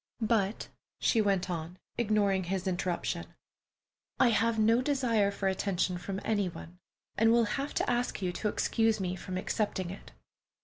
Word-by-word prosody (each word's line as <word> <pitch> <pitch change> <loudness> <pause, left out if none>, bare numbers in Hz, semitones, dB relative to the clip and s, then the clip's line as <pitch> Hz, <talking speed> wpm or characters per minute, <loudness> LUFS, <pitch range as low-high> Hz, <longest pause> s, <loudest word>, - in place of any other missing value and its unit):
"But," 220 -2 0 0.3
she 225 - +3
went 195 -3 +1
on, 170 0 -4 0.2
ignoring 205 -4 +1
his 190 +1 -2
interruption, 180 -1 -2 0.8
"I 255 - +6
have 230 0 +2
no 225 +3 +4
desire 250 -7 +2
for 200 -1 -2
attention 185 -2 0
from 190 +2 -4
any 205 -4 +1
one, 175 +1 -11 0.4
and 225 +1 +5
will 235 0 +5
have 275 +7 -3
to - - +1
ask 245 0 0
you 185 -2 -1
to 210 - -2
excuse 225 +1 +1
me 185 -1 -2
from 185 0 -5
accepting 190 -2 -1
it." 195 - -11
200 Hz, 160 wpm, -30 LUFS, 185-225 Hz, 0.8 s, I